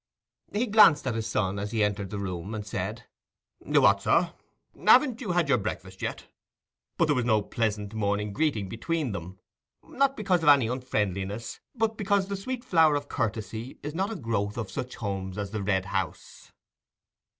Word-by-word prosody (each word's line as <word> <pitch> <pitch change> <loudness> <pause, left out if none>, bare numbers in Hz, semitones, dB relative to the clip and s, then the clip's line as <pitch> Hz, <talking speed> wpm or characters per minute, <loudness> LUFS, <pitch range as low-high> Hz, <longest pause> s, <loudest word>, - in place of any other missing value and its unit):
He 215 +4 0
glanced 205 - +6
at 130 - 0
his 115 0 -2
son 100 -2 -1
as 105 +1 -3
he 110 -2 +1
entered 100 -1 -1
the 105 - -5
room, 95 +1 -4
and 105 -1 -5
said, 105 - -4 0.6
"What, 100 0 +4
sir! 170 - +2 0.4
haven't 260 -5 +4
you 195 -8 -2
had 175 -3 +2
your 135 -4 +3
breakfast 95 -1 -6
yet?" - - -4 0.7
but 170 - +4
there 150 - +2
was 125 -3 0
no 110 -3 +2
pleasant 105 -2 -2
morning 105 -1 -1
greeting 140 -9 0
between 145 - -2
them; 95 -1 -7 0.5
not 275 0 0
because 185 -5 +1
of 160 - +4
any 140 -4 +6
unfriendliness, 105 -4 -2 0.2
but 220 -2 0
because 200 -1 +1
the 200 - -1
sweet 240 +5 -5
flower 165 -10 +4
of 145 - -3
courtesy 110 +2 -3
is 150 +1 -4
not 190 +5 -1
a - - -4
growth 110 - -2
of 110 -5 -4
such 125 +5 -5
homes 95 -3 -4
as 100 -1 -4
the 110 -1 -3
Red 95 -1 0
House. 95 -1 -5
115 Hz, 180 wpm, -27 LUFS, 100-165 Hz, 0.7 s, glanced